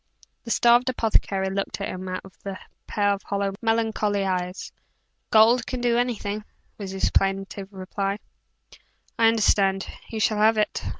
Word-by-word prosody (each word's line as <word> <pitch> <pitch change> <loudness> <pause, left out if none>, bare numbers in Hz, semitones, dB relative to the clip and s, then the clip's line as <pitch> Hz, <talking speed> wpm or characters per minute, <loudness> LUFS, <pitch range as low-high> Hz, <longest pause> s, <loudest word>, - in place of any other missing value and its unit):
The - - -7
starved 240 +2 +4
apothecary 205 -5 +1
looked 195 +1 -3
at 200 - -2
him 185 0 -6
out 185 +1 -5
of 190 - -14
a 195 -1 -5 0.3
pair 205 -2 +1
of 200 - -5
hollow, 200 -1 -2
melancholy 220 -3 +1
eyes. 180 -1 -3 0.6
"Gold 230 +2 +5
can 255 - -3
do 240 -1 +2
anything," 215 -4 -1 0.4
was 200 -2 -5
his 190 0 -1
plaintive 195 0 -1
reply. 195 +1 -3 1.0
"I 225 - +6
understand. 200 -3 +2 0.2
You 220 - -4
shall 215 0 +1
have 220 +1 +4
it. 210 - 0
205 Hz, 155 wpm, -24 LUFS, 195-225 Hz, 1.0 s, I